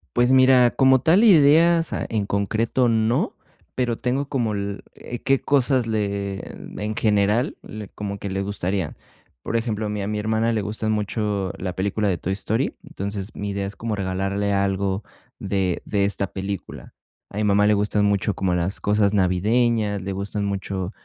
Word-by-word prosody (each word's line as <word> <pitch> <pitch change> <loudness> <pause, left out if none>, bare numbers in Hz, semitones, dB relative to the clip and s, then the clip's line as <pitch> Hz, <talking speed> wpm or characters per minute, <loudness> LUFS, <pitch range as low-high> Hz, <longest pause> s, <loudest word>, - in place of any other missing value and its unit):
Pues 120 +1 +3
mira, 130 -2 +6
como 130 -1 +4
tal 170 - +4
ideas, 165 -3 +5
ah, - - -2
en 105 -3 -1
concreto 110 +5 +1
no, 110 +1 +1 0.4
pero 120 -3 -1
tengo 135 +3 -1
como 120 -6 -1
el 100 0 -4 0.4
qué 135 -1 +3
cosas 130 -3 +2
le 100 -3 -2 0.4
en 110 +1 -2
general, 105 +3 +1
le 105 -1 -8
como 100 -1 -5
que 100 - -5
le 95 +1 -2
gustarían. 95 -3 -2 0.5
Por - - -3
ejemplo, 110 -2 -1
a - - -2
mi 105 -1 -3
a 100 - -3
mi 105 0 -2
hermana 110 +2 +1
le 110 -2 0
gustan 110 +1 -3
mucho 105 -2 -1
la 90 -1 -4
película 100 +3 -1
de 95 -3 +1
Toy 95 +3 -3
Story, 110 +6 -1
entonces 100 +1 -6
mi 100 0 -4
idea 100 0 -2
es 100 - -8
como 110 0 -3
regalarle 100 +1 -1
algo 100 0 0 0.3
de 95 -2 -1
de 100 -1 +1
esta 100 -1 -2
película. 95 -1 -6 0.3
A - - -9
mi 110 - 0
mamá 105 0 +3
le 105 - +4
gustan 105 0 +1
mucho 100 0 +1
como 95 -2 0
las 90 +3 -1
cosas 105 0 +2
navideñas, 105 +3 +1
le 95 +2 -4
gustan 100 +2 -3
mucho, 100 -1 -3
105 Hz, 175 wpm, -23 LUFS, 100-115 Hz, 0.5 s, mira